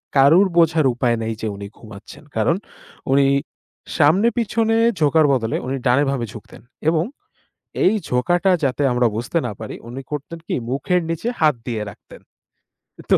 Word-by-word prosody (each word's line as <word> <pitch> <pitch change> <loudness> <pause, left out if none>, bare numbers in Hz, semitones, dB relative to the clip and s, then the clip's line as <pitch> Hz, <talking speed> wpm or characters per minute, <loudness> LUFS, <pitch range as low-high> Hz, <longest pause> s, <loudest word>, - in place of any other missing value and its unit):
কারুর 155 +8 +6
বোঝার 165 -2 +4
উপায় 120 -1 +1
নেই 110 0 -2
যে 110 - -2
উনি 100 0 -7
ঘুমাচ্ছেন। 105 +2 -13
কারণ 115 +10 +2 0.6
উনি 140 +1 +4 0.7
সামনে-পিছনে 225 +7 +2 0.2
ঝোঁকার 155 +1 +4
বদলে 115 -4 -1
উনি 135 +2 -2
ডানে, 125 +3 +4
বামে 135 -4 -1
ঝুঁকতেন। 110 - -12 0.3
এবং 160 -1 +2 0.8
এই 195 - +5 0.2
ঝোঁকাটা 175 +10 +2
যাতে 135 +1 0
আমরা 125 0 +2
বুঝতে 120 +9 -2
না - - -4
পারি, 110 - -6
উনি 125 +3 -7
করতেন 150 +3 -5
কি - - -2 0.2
মুখের 175 +7 0
নিচে 165 +7 -3
হাত 155 -4 +4
দিয়ে 115 -3 -2
রাখতেন। 100 - -15 0.9
তো - - +7
140 Hz, 150 wpm, -20 LUFS, 120-165 Hz, 0.9 s, তো